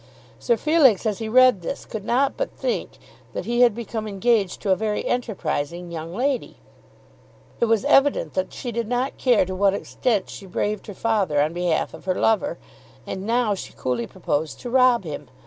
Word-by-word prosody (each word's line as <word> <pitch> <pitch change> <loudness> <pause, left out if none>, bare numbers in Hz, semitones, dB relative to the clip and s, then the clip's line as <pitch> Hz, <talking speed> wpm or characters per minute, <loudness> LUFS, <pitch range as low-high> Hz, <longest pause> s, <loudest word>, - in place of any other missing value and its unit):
Sir 235 -2 +1
Felix 275 - +4
as 210 -3 -1
he 220 -1 -4
read 255 -4 +5
this 170 - -5
could 220 -4 -6
not 260 +5 +1
but - - -2
think - - -3 0.4
that - - -4
he 240 +1 +1
had 240 -4 +5
become 225 -2 -4
engaged 205 -1 +1
to 200 - 0
a - - +5
very 215 +1 -2
enterprising 175 -8 -2
young 165 0 -6
lady. 260 +2 -1 1.0
It - - +3
was 225 -3 +1
evident 275 - +3
that 185 - -2
she 245 - -5
did 230 -1 -2
not 250 +3 -2
care 245 -7 +4
to 185 - -5
what 195 +1 +3
extent 215 0 -1
she 195 - -10
braved 205 +4 -2
her 205 - -8
father 200 -10 +1
on 150 +3 +1
behalf 175 -2 0
of 160 - -12
her 185 -1 0
lover, 225 +6 +1 0.5
and 190 +2 -5
now 235 -2 +2
she 195 - -7
coolly 120 -2 -2
proposed 150 +1 -3
to 245 - -6
rob 255 -3 +4
him. 150 -4 -6
215 Hz, 190 wpm, -23 LUFS, 185-245 Hz, 1.0 s, read